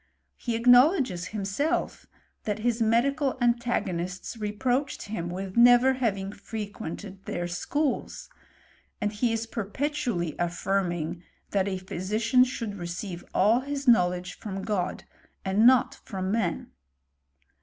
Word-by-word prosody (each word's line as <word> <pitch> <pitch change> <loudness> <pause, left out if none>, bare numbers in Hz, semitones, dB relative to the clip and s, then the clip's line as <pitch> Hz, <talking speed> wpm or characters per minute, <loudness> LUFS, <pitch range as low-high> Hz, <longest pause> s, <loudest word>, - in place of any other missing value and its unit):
He 235 -2 -3
acknowledges 245 - +5
himself 220 - -2 0.4
that 210 -1 -1
his 235 -1 +1
medical 260 +5 +2
antagonists 235 -8 -1
reproached 245 +6 -1
him 180 -5 -4
with 185 +1 -5
never 245 +2 +7
having 200 -6 -1
frequented 205 -3 -7
their 175 0 -3
schools; 275 - -2 0.7
and 210 -1 -1
he 230 +3 +1
is 225 0 -1
perpetually 225 - -2
affirming, 175 -1 -1 0.3
that 195 -1 +1
a 190 -1 -1
physician 210 +7 +1
should 230 -5 -4
receive 175 +1 -5
all 215 +5 +4
hui 285 +2 -4
knowledge 180 -6 +2
from 195 -2 -5
God, 195 -5 -2 0.4
and 200 +4 +4
not 255 -1 +5
from 190 0 -3
man. 200 -6 -1
210 Hz, 115 wpm, -27 LUFS, 185-245 Hz, 0.7 s, never